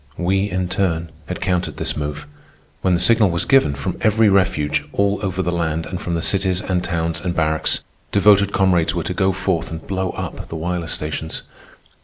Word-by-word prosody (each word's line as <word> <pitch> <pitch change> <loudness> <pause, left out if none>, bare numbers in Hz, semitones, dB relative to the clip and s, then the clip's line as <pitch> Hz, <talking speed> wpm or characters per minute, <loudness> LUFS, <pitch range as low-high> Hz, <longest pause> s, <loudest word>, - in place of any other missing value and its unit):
We, 95 +3 +1
in 90 -1 -1
turn, 85 -3 -1 0.2
had 90 - -5
countered 90 -2 -1
this - - -1
move. 75 0 -4 0.6
When 95 -1 +2
the - - 0
signal 110 0 +5
was 85 0 0
given, 135 - +4
from - - -4
every 110 0 +4
refuge, 95 -7 +2
all 100 0 +1
over 95 -2 -1
the 90 - -1
land, 80 -2 -1
and 90 - -5
from 85 - -2
the 85 - -2
cities, 95 -2 +2
and 90 -1 -1
towns, 85 -1 -2
and 85 -1 -2
barracks, 80 -1 +1 0.3
devoted 100 0 +5
comrades 90 -5 +2
were 85 - -1
to 90 - -3
go 95 +1 +2
forth 95 -3 -1
and 80 0 -7
blow 95 -1 -2
up - - -5
the - - -7
wireless 85 +1 -2
stations. 75 +1 -4
90 Hz, 195 wpm, -20 LUFS, 80-95 Hz, 0.6 s, signal